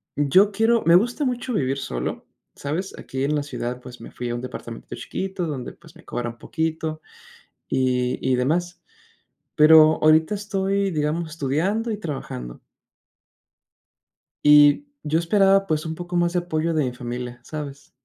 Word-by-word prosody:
yo 185 +9 +4
quiero 225 +3 +2
me 170 - +6
gusta 240 - +2
mucho 250 0 -2
vivir 135 - 0
solo, 60 - -4 0.3
¿sabes? 165 +7 -4
Aquí, 130 0 -5
en 150 +2 +1
la 145 - -1
ciudad, 125 -3 -5
pues 125 -1 -11
me - - -10
fui 120 -1 -5
a 120 - -2
un 120 - -5
departamento 120 -2 -8
chiquito 190 -2 -4
donde, 135 -5 -5
pues, - - -19
me - - -17
cobran 120 -1 -4
poquito 160 +1 -3 0.7
y 125 -1 0
y 130 -1 +1
demás, 175 +8 -1 0.7
pero 155 0 +7
ahorita 155 +4 +4
estoy, 200 -1 -1
digamos, 155 +1 -1
estudiando 165 - -1
y 215 - -1
trabajando. 100 - -6 1.8
Y 150 - +6 0.2
yo 155 +2 +1
esperaba, 195 +3 +3
pues, 155 0 -1
un 160 0 -4
poco 175 +1 -6
más 175 0 +2
de 180 - +2
apoyo 165 -1 -1
de 155 -3 +1
mi 125 - -3
familia, 120 0 -6
¿sabes? 140 -1 -8
155 Hz, 155 wpm, -23 LUFS, 130-185 Hz, 1.8 s, pero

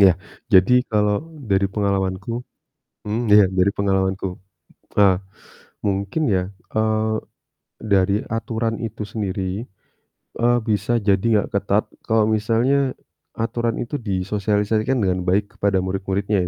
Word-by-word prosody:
Iya, 95 -2 +8 0.4
jadi 95 +5 +6 0.2
kalau 105 -1 +2 0.3
dari 95 0 +3
pengalamanku 100 +3 -1 0.6
hmm, 110 +3 -1
ya, 105 -1 +8
dari 95 +2 +4
pengalamanku. 95 -1 +1 0.7
Tah, 100 -3 +5 0.7
mungkin 100 +10 -1
ya, 90 - +2 0.3
eee, 110 0 +1 0.6
dari 100 -2 +2
aturan 115 0 -2
itu 110 -1 -5
sendiri, 100 -1 -3 0.8
eee, 120 +1 +4
bisa 105 0 0 0.2
jadi 100 +1 +3 0.2
nggak - - -13
ketat 100 +1 +1 0.2
kalau 110 -2 +3
misalnya 125 +5 +1 0.4
aturan 115 0 -1
itu 120 - -5
disosialisasikan 105 +5 0
dengan 90 -1 +1
baik 100 +3 0
kepada 100 -1 +2
murid-muridnya 95 0 -1
105 Hz, 115 wpm, -22 LUFS, 95-110 Hz, 0.8 s, Iya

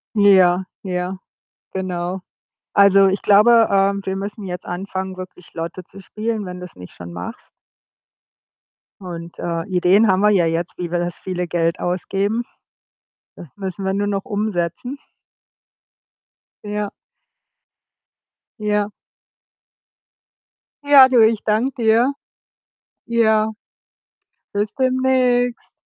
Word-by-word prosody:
Ja, 190 -3 +5 0.2
ja, 180 0 -3 0.5
genau. 185 -1 -3 0.5
Also, 195 -1 +6
ich 190 +1 0
glaube, 225 +3 +6
ähm, 200 0 +2
wir 190 0 -2
müssen 200 +1 -6
jetzt 180 -1 -6
anfangen, 190 +1 -5
wirklich 185 -1 -11
Lotto 170 +2 -5
zu 195 +2 -15
spielen, 215 +1 -4
wenn 180 0 -7
du's 180 - -10
nicht 90 - -11
schon 85 -1 -10
machst. 90 +1 -8 1.5
Und, 170 -2 -8
äh, 170 -1 -2
Ideen 185 +4 +3
haben 190 -1 +3
wir 210 +1 +4
ja 185 -5 +3
jetzt, 165 +1 -2
wie 175 -2 -5
wir 175 - 0
das 175 -1 -3
viele 180 -2 -4
Geld 165 0 0
ausgeben. 195 +5 -1 0.9
Das 170 - -11
müssen 190 -1 -5
wir 190 - 0
nur 205 +1 -1
noch 200 -1 -2
umsetzen. 205 - -3 1.7
Ja. 210 0 -3 1.7
Ja. 210 -1 0 1.9
Ja, 280 -2 +8
du, 250 - +4
ich 220 -1 +1
danke 220 +5 +1
dir. 230 +5 +4 0.9
Ja. 220 -2 +2 1.0
Bis 205 0 -2
demnächst. 255 -2 +1
195 Hz, 115 wpm, -20 LUFS, 180-215 Hz, 1.9 s, Ja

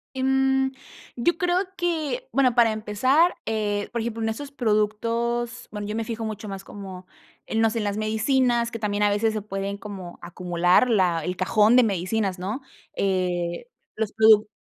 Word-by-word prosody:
Em, 265 0 +2 0.4
yo 295 +9 +1
creo 355 0 +1 0.2
que 350 - -2
bueno, 255 -3 +3
para 235 -2 +5
empezar, 255 - +2
eh, 205 -2 -1
por 235 - -2
ejemplo, 225 0 -3
en 225 - 0
estos 275 +6 -5
productos, 235 +1 -1
bueno, 210 -1 -5
yo 210 - -3
me 225 - -1
fijo 225 0 -4
mucho 215 -1 -5
más 195 -1 -6
como 190 -3 -9 0.4
en, 225 - -1
no 225 - +4
sé, 225 - -4
en - - -2
las 205 0 -2
medicinas 235 +2 +1
que 230 - -5
también 210 -1 -1
a 205 - +4
veces 215 +2 +1
se 215 - -2
pueden 195 -1 -4
como 195 -4 -8
acumular 175 +5 +2
la 180 -7 +2
el 180 - -2
cajón 210 +5 +4
de 250 - +7
medicinas, 195 -1 -1
¿no?, 210 +9 -4 0.3
eh, 180 - -1 0.3
los 220 -1 -2
produc 215 0 +5
220 Hz, 175 wpm, -24 LUFS, 200-240 Hz, 0.4 s, de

